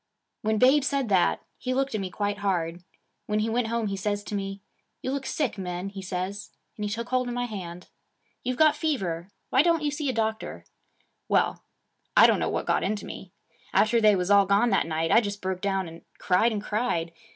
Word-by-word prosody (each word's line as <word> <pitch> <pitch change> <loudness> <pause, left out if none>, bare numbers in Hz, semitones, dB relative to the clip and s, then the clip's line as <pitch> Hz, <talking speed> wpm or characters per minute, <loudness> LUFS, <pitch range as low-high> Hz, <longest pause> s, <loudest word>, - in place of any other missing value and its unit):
When 220 0 +1
Babe 265 +5 +5
said 275 -3 0
that, 190 -3 +2 0.2
he 255 0 -2
looked 270 -1 0
at 215 - -1
me 190 - -3
quite 205 +2 -2
hard. 175 -3 -1 0.4
When 210 - 0
he 220 +1 0
went 235 0 +1
home 230 0 -1
he 200 -1 -2
says 205 +1 -2
to 210 - -7
me, 195 0 -3 0.4
"You 260 - -1
look 275 -1 -3
sick, 260 -9 -1
Min," 180 +1 -4
he 195 -1 -8
says, 190 +2 -4 0.3
and 210 - -6
he 205 - -1
took 230 +3 -4
hold 255 -1 +1
of 245 - -3
my 245 0 -1
hand. 180 -6 -7 0.6
"You've 250 0 -2
got 310 -1 +5
fever. 190 - -2 0.2
Why 260 - +6
don't 335 -1 +2
you 295 - +1
see 290 -1 -2
a - - +2
doctor?" 220 -2 -2 0.6
'Well, - - +2 0.5
I - - +10
don't - - +4
know - - 0
what - - -2
got - - +1
into 205 +2 -2
me. - - -9 0.4
After 230 +2 +4
they 210 -1 +6
was 180 +1 0
all 200 -1 +6
gone 205 +4 +3
that 195 - +2
night, 160 0 -1
I 225 - +7
just 205 -2 -4
broke 185 -1 -3
down, 195 -2 0
and 165 +1 -11 0.2
cried 190 +6 +3
and 210 -2 -3
cried. 210 -7 -1
210 Hz, 220 wpm, -27 LUFS, 190-245 Hz, 0.6 s, I